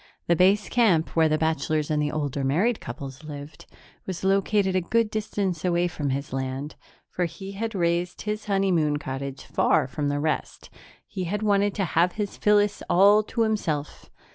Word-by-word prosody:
The 170 - +3
base 195 +4 +3
camp, 200 -10 +2
where 160 -1 +4
the 155 - +2
bachelors 155 -1 0
and 150 -1 +1
the 150 0 0
older 145 -2 -2
married 185 - +1
couples 135 +3 -8
lived, 145 -1 -9 0.4
was 185 -2 -5
located 195 0 +2
a 185 - +2
good 225 +5 +1
distance 200 -5 -2
away 175 -1 +2
from 150 -4 -3
his 140 0 -3
land, 135 +2 -3 0.3
for 180 - -2
he 180 +4 -7
had 220 +2 -4
raised 175 0 -1
his 210 0 -3
honeymoon 185 -7 +1
cottage 135 -1 -5
far - - +2
from 145 +2 -3
the 145 0 -1
rest; 155 +1 -3 0.3
he 185 -2 -5
had 205 +5 -2
wanted 205 -1 +2
to 195 - 0
have 175 +2 +2
his 205 -2 -4
Phyllis 205 0 +2
all 200 +4 +6
to 220 +2 -3
himself. 165 -10 -2
175 Hz, 175 wpm, -25 LUFS, 150-200 Hz, 0.4 s, all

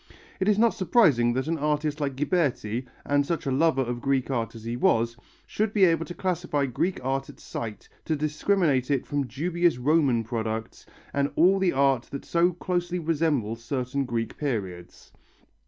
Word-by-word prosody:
It 190 - 0
is 210 -1 +4
not 230 +1 +4
surprising 145 - +3
that 130 +1 -1
an 165 0 -1
artist 150 +1 -1
like 140 -2 -1
Ghiberti, 135 - -1 0.2
and 145 0 +2
such 165 +2 -3
a 135 - 0
lover 135 -1 +2
of 120 -1 -4
Greek 135 -1 0
art 115 -3 -2
as 115 - -10
he 115 +1 -3
was, 115 -1 +2 0.3
should 215 0 -1
be 200 -3 +5
able 165 -2 +2
to 175 - -7
classify 175 -6 -1
Greek 155 +9 -1
art 135 +1 -1
at 140 - -13
sight, 110 -2 -6 0.2
to 160 - 0
discriminate 150 -2 +1
it 140 -3 +1
from 145 -2 -2
dubious 170 +4 0
Roman 135 -3 +2
products 110 -1 -4 0.3
and 140 0 +1
all 190 +4 +5
the 190 -2 +2
art 135 -2 +2
that 140 - -7
so 170 +1 +2
closely 175 0 -2
resembles 145 -9 -1
certain 130 +2 -2
Greek 115 -2 -3
periods. 95 -11 -4
140 Hz, 175 wpm, -26 LUFS, 120-165 Hz, 0.3 s, be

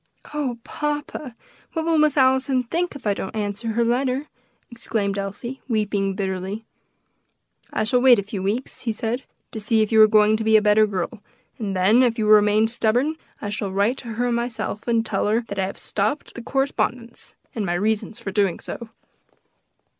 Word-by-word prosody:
"Oh, 275 -5 -2
papa! 295 -3 -4 0.4
what 320 -1 -2
will 330 -1 +3
Miss 300 -1 +3
Allison 260 -1 +3
think 335 +7 -2
if 280 - -10
I 205 - +3
don't 195 +2 -6
answer 205 +1 -3
her 235 +1 +2
letter?" 255 +4 0 0.4
exclaimed 220 -4 -2
Elsie, 220 +7 -5
weeping 205 -4 0
bitterly. 190 +2 -3 1.1
"I - - 0
shall 245 +3 +2
wait 255 -2 +7
a 200 - -1
few 200 -1 -5
weeks," 210 +7 -2
he 235 - -1
said, 225 +4 -3 0.3
"to 220 - -5
see 220 +1 +2
if 215 - -4
you 220 -1 +6
are 215 - +9
going 215 0 +4
to 220 - -3
be 220 0 +5
a - - +6
better 210 +1 +5
girl, 195 +1 -4 0.4
and 200 -4 -3
then, 200 +7 +4
if 240 -2 +2
you 220 - 0
remain 210 +1 +5
stubborn, 240 +6 +1 0.3
I 205 - -2
shall 205 -1 -3
write 200 +7 +1
to 235 -4 -6
her 245 +2 0
myself, 235 -2 -3
and 230 -1 +2
tell 200 -2 -1
her 220 +3 +2
that 200 - -4
I 190 - +1
have 195 - -7
stopped 215 +8 -2
the 240 - -7
correspondence, 240 -2 -2 0.2
and 220 - -2
my 175 -3 -1
reasons 210 +3 -1
for 195 - -6
doing 195 -3 +1
so." 235 -2 -7
220 Hz, 190 wpm, -23 LUFS, 205-250 Hz, 1.1 s, are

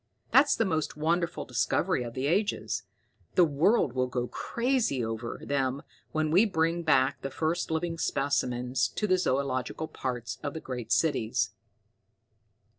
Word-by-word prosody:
"That's 290 +2 +6
the 225 - +1
most 160 -5 -1
wonderful 170 +3 0
discovery - - +1
of 120 -1 -6
the 130 +1 -2
ages. 200 +8 0 0.5
The 180 - +7
world 150 - +2
will 130 0 +1
go 125 -1 -2
crazy 235 - 0
over 115 +1 -4
them 135 -1 -1 0.3
when 155 -1 0
we 185 +6 +6
bring 170 -4 +1
back 135 -4 +2
the 135 - -3
first 160 +5 -1
living 165 +1 -2
specimens 130 -3 0
to 215 - -3
the 185 -2 +3
zoological 135 0 -1
parks 125 -5 -4
of 145 0 -4
the - - -3
great 125 -6 -6
cities. 115 - +1
145 Hz, 145 wpm, -29 LUFS, 130-170 Hz, 0.5 s, The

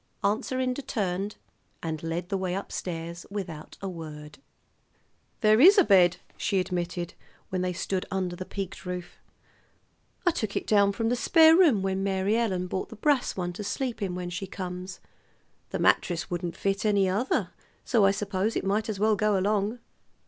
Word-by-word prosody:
Aunt 205 +2 +1
Serinda 255 +1 -1
turned, 200 -5 -2 0.5
and 160 -2 -3
led 165 +2 -3
the 195 - 0
way 185 -1 -1
up 195 - -5
stairs 170 -1 -5
without 180 -7 -6
a - - -2
word. 155 -3 -8 1.0
"There 215 +2 +5
is 390 +7 +9
a 390 - +8
bed," 185 - +5 0.2
she 195 -2 +1
admitted 175 -1 -3 0.4
when 185 -1 -1
they 180 0 0
stood 185 +1 -2
under 185 -2 -2
the 185 - -5
peaked 195 0 -6
roof. 180 -1 -6 1.1
"I 350 - +5
took 215 -10 -3
it - - -1
down 200 -2 +4
from 225 +3 -1
the 245 - +2
spare 320 +5 +6
room 300 - +5
when 190 0 -1
Mary 195 +2 +1
Ellen 195 -6 0
bought 185 +1 -3
the - - -9
brass 270 +1 +1
one 175 -1 -2
to 210 - -6
sleep 245 +3 -3
in 185 -3 -2
when 180 -1 -4
she 185 +2 -4
comes. 185 0 -6 0.7
The - - -2
mattress 175 -1 +1
wouldn't 175 -1 -3
fit 195 0 -1
any 200 -3 +3
other; 205 +8 0 0.3
so 230 -5 +3
I 195 - +6
suppose 200 +1 -1
it - - -1
might 210 +3 0
as 205 -3 -3
well 215 +1 +3
go 210 0 +2
along. 205 +3 0
195 Hz, 180 wpm, -27 LUFS, 180-215 Hz, 1.1 s, is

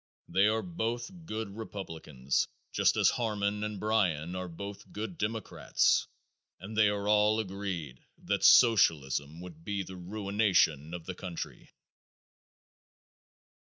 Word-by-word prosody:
They 100 +2 +3
are 110 +1 +1
both 120 -5 -3 0.2
good 110 -2 -4
Republicans, 80 - -3 0.2
just - - +3
as - - +5
Harmon 105 -3 -1
and 105 -2 -4
Bryan 90 -6 0
are 90 0 -4
both 100 +4 -8
good 110 - -5
Democrats 110 - +1 0.5
and 100 +4 -8
they 105 -1 +5
are 100 0 -2
all 105 +1 +4
agreed 95 - -5
that - - -2
Socialism 80 - +4
would 85 -3 -11
be 100 +1 -2
the 95 0 -9
ruination 95 -5 +1
of 85 -2 -8
the 95 - -4
country. 90 -2 -7
100 Hz, 125 wpm, -30 LUFS, 85-110 Hz, 0.5 s, as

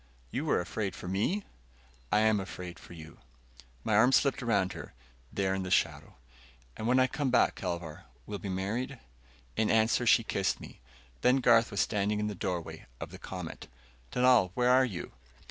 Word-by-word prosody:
"You - - -2
are - - +3
afraid 95 +2 -3
for - - -8
me?" 105 - 0 0.7
"I 105 - +4
am 110 -1 +3
afraid 90 -3 -7
for - - -13
you." 80 -1 -12 0.6
My 110 - +1
arm 120 +5 +6
slipped 140 0 +3
around 100 -6 +1
her, - - -9 0.4
there 95 -1 0
in 95 - -1
the 95 - -4
shadow. 95 - 0 0.6
"And 110 - -4
when 125 +2 +4
I 130 - +5
come 140 +1 -1
back, 125 - +4
Kelvar, 85 -4 -5 0.2
we'll 100 - -5
be 100 - -6
married?" 110 +8 -2 0.6
In 110 -1 +1
answer, 115 +2 +3
she 115 - +6
kissed 95 -3 -1
me. - - -12 0.4
Then 125 +1 +5
Garth 115 -3 +4
was 100 - 0
standing 105 0 0
in 105 - -1
the 105 - -2
doorway 90 -3 -4
of - - -7
the - - -10
Comet. - - -7 0.4
"Dunal, 125 -6 +4
where 125 0 +3
are 130 +1 +6
you?" 95 -8 -6
105 Hz, 180 wpm, -30 LUFS, 95-125 Hz, 0.7 s, arm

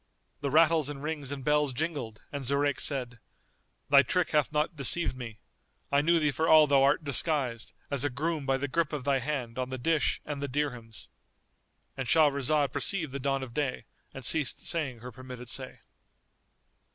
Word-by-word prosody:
The 140 - -2
rattles 160 0 +4
and 145 -1 -7
rings 150 -3 -4
and 140 -2 -5
bells 150 -1 +2
jingled 125 -6 -4
and 140 -1 -5
Zurayk 140 +1 0
said, 125 -4 -1 0.7
"Thy 140 -1 +7
trick 180 +7 0
hath 150 -2 +2
not 150 +3 0
deceived 150 +1 +2
me. 120 -4 -8 0.5
I 140 0 +4
knew 170 +3 +3
thee 150 -2 +1
for 160 +4 -1
all 155 -1 +8
thou 140 -2 +3
art 140 +4 +3
disguised 140 -4 +1 0.2
as 140 -2 -1
a 145 - +1
groom 150 +2 -3
by 135 0 +2
the 140 +2 -3
grip 155 +2 -1
of 145 -3 -3
thy 135 0 +1
hand 130 -3 -4
on 130 0 -2
the 130 - -4
dish 155 +3 +1
and 145 -2 -5
the 140 - -2
dirhams."— 125 -5 -4 0.9
And 135 -2 -4
Shahrazad 145 -1 +3
perceived 170 -8 -1
the 140 - -5
dawn 135 0 -1
of 120 -3 -8
day 140 -1 -2 0.3
and 135 -2 -8
ceased 155 -1 0
saying 135 -8 0
her 125 +1 -8
permitted 125 -2 -10
say. - - -5
140 Hz, 185 wpm, -29 LUFS, 130-150 Hz, 0.9 s, all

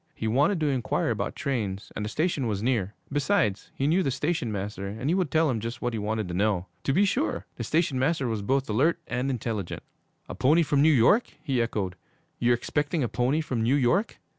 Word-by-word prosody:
He 110 - -3
wanted 145 - +2
to - - +2
inquire 130 -4 0
about - - -2
trains 105 -8 -3
and 105 - -3
the 105 - -3
station 150 -1 0
was 105 -2 -2
near. 110 -5 0 0.2
Besides, 140 - +1
he 135 - -1
knew 165 +6 +3
the 140 - 0
station 140 -2 -1
master, 100 -1 -4
and 110 +9 -2
he - - +3
would 185 -4 +1
tell 160 +3 +3
him 125 -5 0
just 115 +3 -5
what 120 -1 -2
he 110 - -2
wanted 105 0 -2
to - - -4
know. 95 -1 +1 0.2
To - - +2
be 195 +8 +4
sure! 265 - -1
The - - -3
station 155 -5 +1
master 135 -1 +1
was 110 -3 -2
both 135 +6 0
alert 135 +12 +2
and 125 +3 -2
intelligent. 110 -7 -3 0.4
'A - - -6
pony 155 +6 +4
from 145 -2 +2
New 160 +2 +6
York?' 145 - +4
he 130 -5 +1
echoed. 100 -6 -2 0.4
'You're 120 0 +4
expecting 145 +5 -1
a - - +1
pony 130 +7 +1
from 130 -7 -2
New 120 +5 +3
York? 145 - +1
125 Hz, 220 wpm, -27 LUFS, 110-150 Hz, 0.4 s, New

